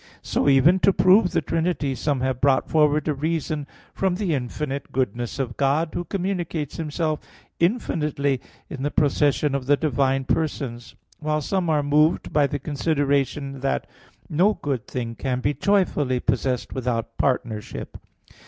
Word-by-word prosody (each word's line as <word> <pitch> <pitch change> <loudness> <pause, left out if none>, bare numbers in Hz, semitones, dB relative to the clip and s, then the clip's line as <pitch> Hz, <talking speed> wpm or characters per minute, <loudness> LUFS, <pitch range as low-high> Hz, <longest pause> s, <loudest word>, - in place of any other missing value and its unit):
So - - +1
even 150 +7 +5
to 195 - +5
prove 185 +1 +5
the - - 0
Trinity 165 -4 0
some 140 0 -1
have 130 -1 -1
brought 135 -1 +3
forward 150 -1 +2
a 150 - +2
reason 155 0 -2 0.3
from 190 -2 0
the 185 -4 -1
infinite 140 +2 -3
goodness 120 -1 -2
of 125 -3 -3
God, 145 +4 +2
who 175 - -3
communicates 175 -6 -3
Himself 155 0 -1 0.4
infinitely 150 - 0 0.3
in 140 -5 -7
the 145 - 0
procession 145 0 +2
of 135 -2 -2
the 145 0 +4
divine 135 -2 +1
persons; 130 -5 -2 0.2
while 155 0 0
some 175 +3 -1
are 150 -2 +2
moved 150 +3 +2
by 145 -1 +4
the 145 - -3
consideration 140 -1 -1
that 135 +1 -1 0.4
"no 190 +7 +3
good 135 -6 -3
thing 120 -3 -4
can 125 +3 -2
be 140 +3 0
joyfully 150 -10 +1
possessed 125 0 -1
without 115 -3 -2
partnership." 120 -5 -2
145 Hz, 150 wpm, -24 LUFS, 135-160 Hz, 0.4 s, even